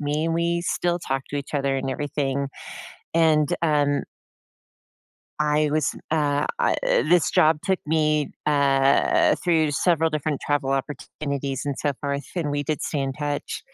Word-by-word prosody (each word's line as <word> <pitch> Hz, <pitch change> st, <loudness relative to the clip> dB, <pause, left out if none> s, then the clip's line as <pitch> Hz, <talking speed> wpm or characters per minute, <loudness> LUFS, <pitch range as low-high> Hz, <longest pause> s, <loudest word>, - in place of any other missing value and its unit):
me, 150 Hz, +2 st, -1 dB
and 165 Hz, -, 0 dB
we 170 Hz, +1 st, 0 dB
still 175 Hz, 0 st, 0 dB
talk 135 Hz, -4 st, -2 dB
to 145 Hz, -, -3 dB
each 140 Hz, +1 st, -7 dB
other 140 Hz, -1 st, 0 dB
and 135 Hz, 0 st, -2 dB
everything, 140 Hz, -1 st, -2 dB, 0.7 s
and, 155 Hz, -3 st, +3 dB
um 145 Hz, -3 st, +2 dB, 1.4 s
I 150 Hz, 0 st, +2 dB
was, 155 Hz, -1 st, 0 dB, 0.2 s
uh, 145 Hz, -2 st, +1 dB
I 480 Hz, -, +2 dB
eh -, -, +2 dB
this 175 Hz, -2 st, +4 dB
job 155 Hz, 0 st, +4 dB
took 190 Hz, -1 st, 0 dB
me, 155 Hz, -1 st, +1 dB, 0.2 s
uh, 140 Hz, -2 st, +3 dB
through 160 Hz, -4 st, +2 dB
several 165 Hz, +1 st, +2 dB
different 155 Hz, -1 st, -2 dB
travel 145 Hz, -2 st, -1 dB
opportunities 140 Hz, 0 st, -3 dB
and 140 Hz, -1 st, -2 dB
so 145 Hz, -, 0 dB
forth, 140 Hz, -1 st, -2 dB
and 155 Hz, -4 st, -1 dB
we 145 Hz, 0 st, -1 dB
did 150 Hz, +1 st, -3 dB
stay 145 Hz, -, -2 dB
in 135 Hz, -1 st, -1 dB
touch. 145 Hz, 0 st, -4 dB
150 Hz, 155 wpm, -24 LUFS, 140-160 Hz, 1.4 s, this